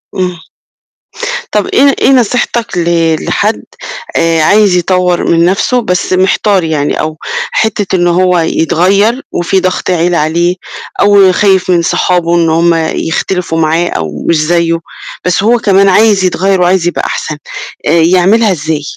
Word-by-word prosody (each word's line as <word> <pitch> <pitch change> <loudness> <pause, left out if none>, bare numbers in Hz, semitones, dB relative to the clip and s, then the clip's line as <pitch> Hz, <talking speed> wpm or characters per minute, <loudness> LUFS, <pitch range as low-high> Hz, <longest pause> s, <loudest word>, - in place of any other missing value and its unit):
إمم. 180 -3 -3 1.1
طَب 210 -2 0
إيه 275 +1 +3
إيه - - +3
نصيحتك 240 -4 0
ل 165 -2 +1
لحد - - -1 0.5
آآ، 165 -1 +1
عايز 205 +3 +3
يطوّر 180 0 0
من 170 0 +3
نَفْسه 220 +7 0
بس 180 -3 -2
محتار 190 +1 +1
يعني 155 -3 -2
أو 155 0 -3 0.3
حتّة 210 -3 -1
إنه 175 -1 +1
هو 180 0 +2
يتغيّر 190 - +1
وفي 180 +2 0
ضَغْط 185 0 -2
عيلة 175 -1 +1
عليه 170 +4 0 0.5
أو 200 -2 +5
خايف 190 -1 +1
من 175 -2 +2
صحابه 175 0 0
إن 170 -1 +1
هم 170 +1 +2 0.2
يختلفوا 165 0 -2
معاه 165 +2 +1
أو 75 -2 -5
مش 170 - +3
زيّه، 165 +1 0 0.5
بس 180 +2 0
هو 235 +2 +3
كمان 195 -2 +3
عايز 205 0 +3
يتغيّر 190 +1 0
وعايز 175 -1 +1
يبقى - - -2
أحسن، 155 - -4 0.5
آآ - - +2
يعملها 185 +6 +3
إزاي؟ 155 -2 -3
180 Hz, 145 wpm, -10 LUFS, 165-195 Hz, 1.1 s, أو